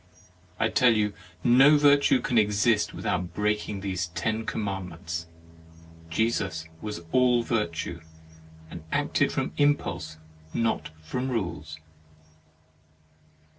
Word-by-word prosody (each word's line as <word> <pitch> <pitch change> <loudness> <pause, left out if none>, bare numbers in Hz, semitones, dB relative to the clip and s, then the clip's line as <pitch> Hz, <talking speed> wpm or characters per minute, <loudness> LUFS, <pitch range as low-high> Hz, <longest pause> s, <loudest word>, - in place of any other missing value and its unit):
I 110 0 +2
tell 125 -3 +4
you, 105 -1 +1 0.3
no 135 +5 +7
virtue 145 -3 +4
can 120 -1 +2
exist 105 +1 +2
without 90 -1 -3
break 105 0 0
ing 100 -2 -4
these 95 -2 -2
ten 110 +7 -2
commandments. 90 -5 -4 0.8
Jesus 95 -4 -1 0.2
was 105 -5 -5
all 125 -2 +4
virtue, 85 -7 -2 0.7
and 85 - -8
acted - - +1
from - - -2
im 145 0 +5
pulse, 80 -7 -6 0.4
not 115 -8 0
from 125 +11 -3
rules." 85 - -3
105 Hz, 110 wpm, -27 LUFS, 85-120 Hz, 0.8 s, no